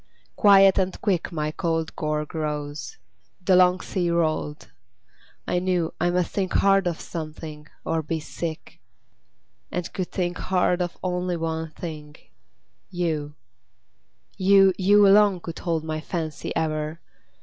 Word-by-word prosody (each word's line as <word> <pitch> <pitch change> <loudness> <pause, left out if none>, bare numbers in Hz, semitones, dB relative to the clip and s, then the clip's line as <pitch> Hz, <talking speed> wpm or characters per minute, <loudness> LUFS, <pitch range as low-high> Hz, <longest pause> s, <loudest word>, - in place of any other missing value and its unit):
Quiet 195 -2 +6
and 190 0 -1
quick 185 -6 0
My 155 -2 -2
cold 165 -1 -2
gorge 150 -1 -2
rose; 150 - -4 0.5
the 190 - +5
long 180 0 +5
sea 180 -3 -1
rolled; 155 -3 -1 0.8
I 180 - +1
knew 180 -3 0
I 175 - +3
must 180 0 0
think 190 -3 -2
hard 195 -1 +4
of 170 -2 -2
something, 155 -2 -7 0.2
or 165 0 0
be 160 +1 -3
sick; 160 +1 -6 0.9
And 180 -1 -4
could 185 -2 -3
think 175 -1 -2
hard 180 -1 +1
of 175 -1 -3
only 180 -1 -1
one 160 0 -3
thing 155 -2 -8 0.7
YOU! 160 -5 -2 1.0
You, 195 0 +5
you 205 +2 +5
alone 200 -1 +5
could 165 -1 -7
hold 165 -2 -1
my 155 -1 -3
fancy 160 -2 -4
ever! 155 0 -2
170 Hz, 135 wpm, -24 LUFS, 155-185 Hz, 1.0 s, Quiet